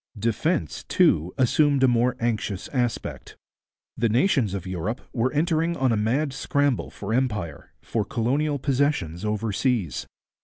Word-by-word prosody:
Defence, 115 - -1
too, 80 +4 +3
assumed 140 +2 +3
a - - +7
more 125 +1 +2
anxious 105 -5 -2
aspect. 120 -4 -3 0.6
The 115 0 +1
nations 120 - +2
of 95 - -5
Europe 95 +6 -3
were 125 +1 +1
entering 165 +2 +1
on 130 -2 +2
a - - +2
mad 130 +7 0
scramble 145 -1 0
for 100 +2 -5
empire, 105 - -2
for 110 - -1
colonial 140 +7 0
possessions 130 - 0
overseas. 105 - -1
120 Hz, 130 wpm, -25 LUFS, 105-140 Hz, 0.6 s, a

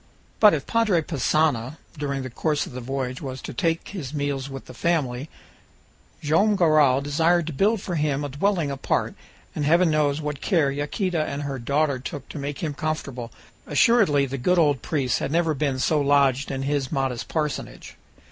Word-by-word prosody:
But 210 -5 +7
if 140 - -4
Padre 215 -8 +2
Passanha 150 -3 0 0.2
during 140 -3 -3
the 130 - -6
course 150 +4 0
of - - -10
the 125 0 -6
voyage 130 0 -4
was 130 -2 -5
to - - -6
take 165 +6 -1
his 155 -8 -6
meals 140 -2 -2
with 135 -1 -8
the - - -11
family, 140 -2 -1 0.9
Joam 180 +8 +3
Garral 155 -7 +4
desired 165 +4 +2
to 165 - -5
build 205 +8 +2
for 185 - -4
him 150 -3 0
a 145 - -3
dwelling 160 +1 0
apart, 135 - -1 0.4
and 150 - -3
heaven 170 +3 +4
knows 150 -1 +1
what 150 -2 -4
care 160 -8 +2
Yaquita 155 +4 -1
and 140 +1 -4
her 140 -2 -4
daughter 140 +2 0
took 135 +1 -7
to 150 - -7
make 140 +2 -5
him 155 -3 -1
comfortable! 140 -6 -4 0.4
Assuredly 195 -13 +4
the 135 0 -5
good 180 +9 +2
old 145 -5 +3
priest 135 -8 0
had - - -3
never 165 0 +2
been 140 -2 -1
so 150 +3 +1
lodged 140 -1 +3
in 135 0 -3
his 140 -1 -1
modest 135 -5 -2
parsonage! 150 -3 -4
145 Hz, 185 wpm, -24 LUFS, 135-160 Hz, 0.9 s, But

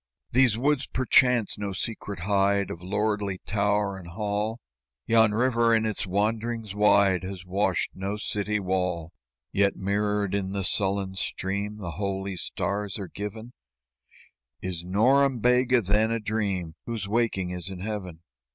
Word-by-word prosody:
"These 125 -3 +4
woods, 140 +2 +1
perchance, 125 -4 +3
no 100 -1 -3
secret 100 -2 -4
hide 100 +1 +2
Of 85 - -7
lordly 105 0 -1
tower 100 -1 0
and 90 - -11
hall; 105 +4 -2 0.5
Yon 110 -1 +5
river 115 0 +3
in 110 0 +2
its 105 -2 -2
wanderings 110 +2 -1
wide 100 -3 +4
Has 95 0 -7
washed 95 0 0
no 100 +2 -3
city 105 0 -1
wall; 90 -3 -1 0.4
"Yet 100 0 +2
mirrored 100 0 0
in 100 -1 -1
the 100 -1 -1
sullen 95 +1 0
stream 100 +3 -3
The 90 -5 -5
holy 95 +1 -3
stars 100 +3 -2
are 100 -3 -6
given: 110 +4 -6 1.1
Is 90 -2 -4
Norembega, 125 +4 +3
then, 105 +3 +3
a 115 0 0
dream 100 -6 -2
Whose 115 -4 -3
waking 105 -5 0
is 90 0 -3
in 95 -2 -7
Heaven? 95 -5 -5
100 Hz, 140 wpm, -26 LUFS, 95-110 Hz, 1.1 s, Yon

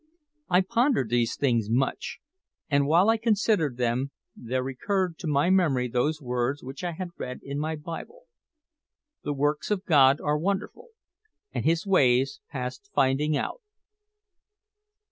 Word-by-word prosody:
I 180 +1 +5
pondered 235 - +1
these 120 -1 +1
things 120 -6 +1
much, 130 +4 -1 0.5
and 140 0 +3
while 170 +6 +4
I 225 0 +4
considered 210 - +1
them 125 +2 0 0.3
there 125 +2 -3
recurred 175 +7 -2
to 170 - -5
my 150 +4 +2
memory 150 -10 +2
those 125 +6 0
words 125 +1 -2
which 135 +6 -8
I 175 -1 -2
had 180 +2 -5
read 125 0 -6
in 140 +1 -4
my 155 +1 -2
Bible: 170 - -8 1.0
"The 145 - -2
works 145 +2 0
of 205 -3 -1
God 140 -3 +5
are 150 0 0
wonderful, 200 - -3 0.6
and - - -3
His 165 +3 +2
ways 135 -8 +3
past 130 +9 -6
finding 140 +3 +2
out." - - -4
150 Hz, 145 wpm, -26 LUFS, 130-185 Hz, 1.0 s, I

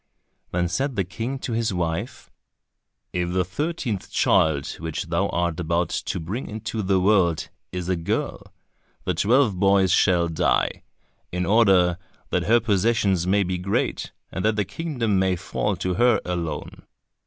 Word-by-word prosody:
Then 90 0 0
said 135 +8 -1
the 100 - +1
King 115 +10 -4
to 125 - -4
his 115 -1 0
wife, 85 -2 -3 0.8
"If 90 0 -1
the 90 -1 +1
thirteenth 130 - -3
child 75 -3 +2
which 80 -1 -4
thou - - +1
art 85 -1 -1
about 85 +1 0
to - - -3
bring 95 +11 -4
into 110 +1 -4
the 95 -1 +2
world, 90 -4 +2 0.2
is 90 -1 -4
a 95 - +1
girl, 85 -1 -3 0.5
the - - 0
twelve 115 -3 +2
boys 95 -2 +4
shall 90 -2 +3
die, 80 -2 +1 0.5
in 90 0 -1
order 95 -4 +4 0.3
that - - 0
her 120 +2 +5
possessions 100 -4 +1
may 100 +2 +3
be 90 -1 -2
great, 95 +2 -1 0.2
and 95 - -4
that 110 0 +2
the 105 -1 0
kingdom 120 - -1
may 95 -1 +2
fall 100 +3 -2
to 90 +1 -2
her 120 +3 +4
alone." 85 -4 -4
95 Hz, 155 wpm, -24 LUFS, 90-110 Hz, 0.8 s, her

